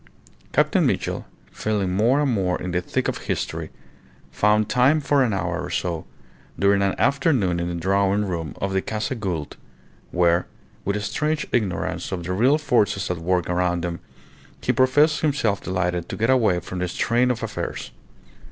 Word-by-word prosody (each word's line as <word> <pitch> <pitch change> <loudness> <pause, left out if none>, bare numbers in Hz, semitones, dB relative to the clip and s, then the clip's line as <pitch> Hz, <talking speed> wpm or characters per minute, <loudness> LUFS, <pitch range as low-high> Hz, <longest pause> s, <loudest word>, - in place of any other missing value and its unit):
Captain - - +3
Mitchell, - - -1 0.2
feeling 105 -4 -1
more 120 +9 +3
and 140 -3 +1
more 95 -4 0
in 90 - -4
the 90 0 0
thick - - -2
of - - -2
history, - - -3 0.6
found 105 0 +2
time 130 +6 +4
for 140 -1 +2
an 120 - +1
hour 90 -2 -2
or 85 - -5
so 85 -3 -2 0.5
during 100 +2 +3
an 100 -1 +1
afternoon 135 - +2
in 85 - -2
the 85 - -3
drawing 100 +3 +1
room 85 -6 -4
of 95 0 -2
the 95 - +1
Casa 110 +4 -3
Gould, 90 - -4 0.5
where, 85 0 +2 0.4
with 100 - 0
a 105 - -2
strange 155 +8 -1
ignorance 105 -7 -1
of 90 -2 -3
the 90 +2 -3
real 125 +10 +4
forces 105 -10 +1
at 90 - -3
work 90 +1 0
around 90 -1 0
him, 85 -1 -4 0.6
he - - +1
professed 145 +4 +3
himself 125 -9 +1
delighted 90 -2 -2
to - - -5
get 115 +3 +2
away 110 -9 +3
from 90 - -6
the 90 - -1
strain 120 +7 +1
of 120 -2 -1
affairs. - - -4
100 Hz, 175 wpm, -23 LUFS, 90-120 Hz, 0.6 s, time